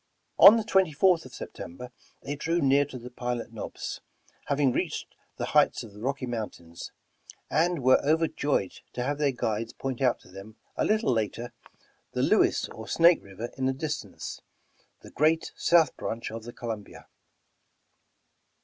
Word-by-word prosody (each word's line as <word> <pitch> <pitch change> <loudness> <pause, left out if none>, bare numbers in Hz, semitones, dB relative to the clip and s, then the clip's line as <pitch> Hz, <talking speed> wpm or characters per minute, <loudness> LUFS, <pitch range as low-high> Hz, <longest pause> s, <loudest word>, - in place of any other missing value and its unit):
On 215 - +10
the 225 - 0
24th 185 - +3
of 130 - -12
September, 120 +9 -8 0.3
they 145 +1 -3
drew 165 +4 0
near 140 -1 +4
to 130 -2 -9
the 125 +1 -10
"Pilot 120 -1 -4
Knobs," 110 - -6 0.5
having 140 -2 +2
reached - - -3 0.2
the - - -2
heights - - +4
of 110 -3 -12
the 105 - -12
Rocky 135 +2 -2
Mountains, 105 -8 -6 0.6
and 165 0 +1
were 130 +1 +5
overjoyed 150 - +1 0.2
to 125 - -2
have 145 +3 -2
their 145 -2 +3
guides 115 -2 -2
point 135 -1 -4
out 125 -3 +2
to - - -18
them, 100 +3 -11 0.2
a - - 0
little 215 - +2
later, 115 +2 -2 0.6
the - - 0
Lewis - - +3
or - - -9
Snake 170 +1 +5
River 100 +4 -7
in 130 - +1
the 135 - +1
distance, 150 +2 -5 0.6
the - - -13
great 160 +2 +2
south 165 -4 +3
branch 115 0 -4
of 115 0 -7
the 120 - -8
Columbia. 110 -4 -7
130 Hz, 160 wpm, -27 LUFS, 115-155 Hz, 0.6 s, On